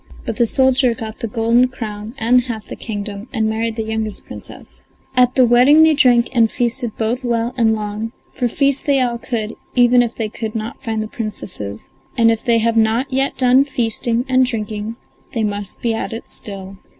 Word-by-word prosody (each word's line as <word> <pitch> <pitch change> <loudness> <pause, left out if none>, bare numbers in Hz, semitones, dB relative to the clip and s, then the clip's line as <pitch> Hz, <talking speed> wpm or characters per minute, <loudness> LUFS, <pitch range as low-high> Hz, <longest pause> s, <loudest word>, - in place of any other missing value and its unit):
But 230 -4 -3
the 235 - +3
soldier 260 -1 +3
got 220 -1 -7
the 230 - -3
golden 230 +3 +3
crown 220 -2 -7
and 245 +1 +4
half 225 -4 -5
the - - -8
kingdom, 205 0 -6
and 220 -4 0
married 220 +1 -1
the 225 - -2
youngest 220 -1 -4
Princess. - - -11 0.3
At 250 0 +4
the 255 - +6
wedding 255 +6 +6
they 320 0 +5
drank 245 -4 +4
and 230 -3 +4
feasted 240 -1 -1
both 235 +4 -1
well 235 0 -1
and 225 -3 +3
long; 215 +1 -4 0.2
for 250 - 0
feast 275 +3 0
they 280 -1 +4
all 240 -2 0
could, 225 -2 -3 0.2
even 245 0 +5
if 235 -1 -2
they 225 - -2
could 220 +1 -6
not 220 +1 -5
find 220 -3 -2
the - - -5
Princesses, 180 - -7 0.3
and 230 -1 +5
if 225 - -2
they 235 -3 +3
have 230 0 +1
not 225 +4 +1
yet 270 +1 0
done 255 +1 +5
feasting 235 -2 -1
and 260 0 +4
drinking 215 -1 -4 0.4
they 225 - 0
must 205 -1 -4
be 230 -1 +1
at 225 - -3
it 225 - -8
still. 195 -1 -5
230 Hz, 200 wpm, -18 LUFS, 220-250 Hz, 0.4 s, the